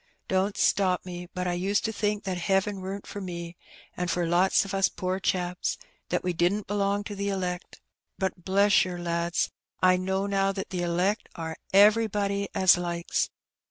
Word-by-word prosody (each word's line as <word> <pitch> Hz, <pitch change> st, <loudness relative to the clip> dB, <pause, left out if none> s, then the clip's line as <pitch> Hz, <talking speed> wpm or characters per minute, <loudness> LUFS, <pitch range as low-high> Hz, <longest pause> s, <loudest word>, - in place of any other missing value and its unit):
Don't 190 Hz, +2 st, 0 dB
stop 185 Hz, -3 st, +2 dB
me; 175 Hz, -1 st, -7 dB
but 180 Hz, 0 st, -3 dB
I 175 Hz, -, 0 dB
used 195 Hz, +4 st, 0 dB
to 220 Hz, -, -1 dB
think 210 Hz, 0 st, -1 dB
that 185 Hz, -2 st, -3 dB
heaven 195 Hz, +2 st, 0 dB
wer'n't 195 Hz, +2 st, -5 dB
for 205 Hz, -, -7 dB
me, 170 Hz, -2 st, -6 dB, 0.4 s
and 180 Hz, 0 st, -2 dB
for 175 Hz, 0 st, 0 dB
lots 180 Hz, +4 st, +3 dB
o' 195 Hz, 0 st, -4 dB
us 195 Hz, 0 st, +3 dB
poor 185 Hz, +1 st, -2 dB
chaps 180 Hz, -2 st, -1 dB, 0.2 s
— -, -, -41 dB
^that 180 Hz, -, 0 dB
we 180 Hz, -1 st, 0 dB
didn't 180 Hz, +5 st, +1 dB
belong 200 Hz, 0 st, 0 dB
to 205 Hz, -, -6 dB
the 200 Hz, 0 st, -2 dB
elect; 180 Hz, -2 st, -3 dB, 0.4 s
but, 190 Hz, -2 st, -2 dB
bless 200 Hz, +2 st, +4 dB
yer, 180 Hz, -1 st, -4 dB
lads, 170 Hz, 0 st, -1 dB, 0.3 s
I 185 Hz, 0 st, +5 dB
know 190 Hz, +1 st, -1 dB
now 195 Hz, -1 st, +1 dB
that 195 Hz, -1 st, -5 dB
the 180 Hz, -2 st, -2 dB
elect 180 Hz, +5 st, 0 dB
are 160 Hz, -1 st, -5 dB, 0.2 s
everybody 205 Hz, -1 st, +4 dB
as 185 Hz, -1 st, +6 dB
likes. 170 Hz, -1 st, -1 dB
190 Hz, 185 wpm, -27 LUFS, 175-200 Hz, 0.4 s, as